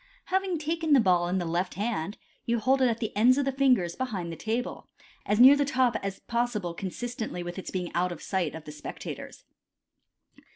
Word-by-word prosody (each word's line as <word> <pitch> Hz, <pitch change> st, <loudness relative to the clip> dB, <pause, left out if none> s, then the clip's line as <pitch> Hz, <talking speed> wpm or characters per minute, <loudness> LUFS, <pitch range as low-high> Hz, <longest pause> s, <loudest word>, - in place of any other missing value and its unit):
Having 380 Hz, -2 st, +1 dB
taken 320 Hz, 0 st, 0 dB
the 275 Hz, -, +7 dB
ball 180 Hz, -5 st, +3 dB
in 180 Hz, +2 st, 0 dB
the 180 Hz, -, -1 dB
left 170 Hz, +3 st, -1 dB
hand, 205 Hz, -2 st, -2 dB, 0.3 s
you 235 Hz, 0 st, +2 dB
hold 265 Hz, +5 st, +2 dB
it 255 Hz, -, +5 dB
at 230 Hz, -2 st, 0 dB
the 220 Hz, -2 st, -4 dB
ends 245 Hz, +5 st, +5 dB
of 285 Hz, -, +1 dB
the 275 Hz, -, +1 dB
fingers 255 Hz, -11 st, +2 dB
behind 200 Hz, -10 st, -3 dB
the -, -, -5 dB
table, 225 Hz, +7 st, -3 dB, 0.4 s
as 210 Hz, -, +1 dB
near 265 Hz, +3 st, +10 dB
the 285 Hz, -, +2 dB
top 260 Hz, -3 st, +2 dB
as 195 Hz, -1 st, -4 dB
possible 235 Hz, -7 st, -1 dB
consistently 215 Hz, +1 st, -5 dB
with 175 Hz, +2 st, -6 dB
its -, -, -7 dB
being 180 Hz, -2 st, -3 dB
out 180 Hz, +1 st, +1 dB
of 175 Hz, -, -6 dB
sight 180 Hz, -6 st, -2 dB
of 160 Hz, -, -8 dB
the 150 Hz, -, -7 dB
spectators. 150 Hz, -, -8 dB
220 Hz, 205 wpm, -28 LUFS, 180-260 Hz, 0.4 s, near